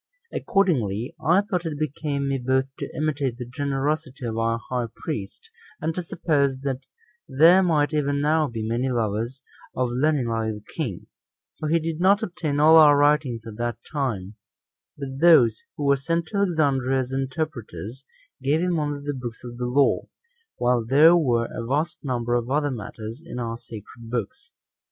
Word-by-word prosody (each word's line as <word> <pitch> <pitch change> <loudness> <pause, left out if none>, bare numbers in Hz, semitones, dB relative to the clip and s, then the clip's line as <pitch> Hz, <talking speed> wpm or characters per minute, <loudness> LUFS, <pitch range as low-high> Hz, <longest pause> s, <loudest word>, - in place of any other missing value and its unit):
Accordingly, 125 - 0
I 175 +5 +4
thought 195 -4 -2
it 160 -3 -4
became 145 -1 -2
me 135 -1 0
both 130 +1 +1
to - - -4
imitate 145 -5 -1
the 125 - -5
generosity 140 +1 -2
of 115 -1 -3
our 115 0 +1
high 125 -2 -1
priest, 105 -11 -6 0.3
and 160 +2 -1
to 180 - -3
suppose 145 -5 0 0.7
there 165 +7 +6
might 155 -4 +2
even 145 -1 +1
now 155 +1 +2
be 115 -3 -4
many 120 +4 0
lovers 115 +2 -2 0.3
of 125 -1 0
learning 135 0 +1
like 115 -1 -1
the 105 - -11
king; 125 - -4 0.5
for 155 - -2
he 165 - +4
did 165 0 -3
not 200 +4 +4
obtain 165 -7 -2
all 160 +2 +7
our 150 -2 +8
writings 145 -5 +2
at 110 -2 -9
that 120 0 -2
time; 110 -10 -2 0.6
but 135 -2 -6
those 130 -10 +6 0.2
who 145 - -3
were 140 0 +4
sent 165 +5 -1
to 205 - -3
Alexandria 140 -9 +2
as 130 0 -6
interpreters, 135 -3 -4 0.4
gave 140 +4 +2
him 175 -1 0
only 145 -1 -3
the 145 - -1
books 120 -3 -7
of 120 -1 -8
the 125 0 -2
law, 135 +3 +2 0.5
while 120 -1 +2
there 145 +8 +6
were 120 -8 +2
a 115 - -4
vast 145 +7 -2
number 120 -3 -1
of 120 0 0
other 145 +1 +1
matters 110 +1 -7
in 170 -6 -8
our 115 -2 -3
sacred 115 +1 -11
books. 255 - -4
135 Hz, 170 wpm, -24 LUFS, 120-155 Hz, 0.7 s, our